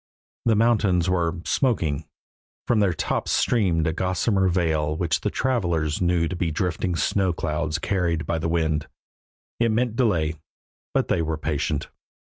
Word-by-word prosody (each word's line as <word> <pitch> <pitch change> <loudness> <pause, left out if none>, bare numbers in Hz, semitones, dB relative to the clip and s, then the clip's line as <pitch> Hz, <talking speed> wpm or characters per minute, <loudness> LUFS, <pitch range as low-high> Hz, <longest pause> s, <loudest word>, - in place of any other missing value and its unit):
The 115 -2 +4
mountains 105 -6 +3
were 85 -1 0
"smoking"; 85 - 0 0.6
from 120 - +3
their 100 -3 +3
tops 80 - -2
streamed 90 -9 +2
a 80 - 0
gossamer 95 +2 +1
veil 80 -4 +1
which 85 0 0
the - - 0
travelers 85 - 0
knew 85 -2 +2
to 90 - -4
be 85 -1 -1
drifting 90 +2 -1
snow 90 +3 +1
clouds 75 0 -2
carried 85 -4 -1
by 80 - -1
the 80 - -1
wind. 80 -2 0 0.7
It 115 0 +3
meant 115 +1 0
delay, 80 - +1 0.5
but - - +2
they - - +1
were 80 -1 -2
patient. 75 -1 -2
85 Hz, 150 wpm, -24 LUFS, 80-100 Hz, 0.7 s, The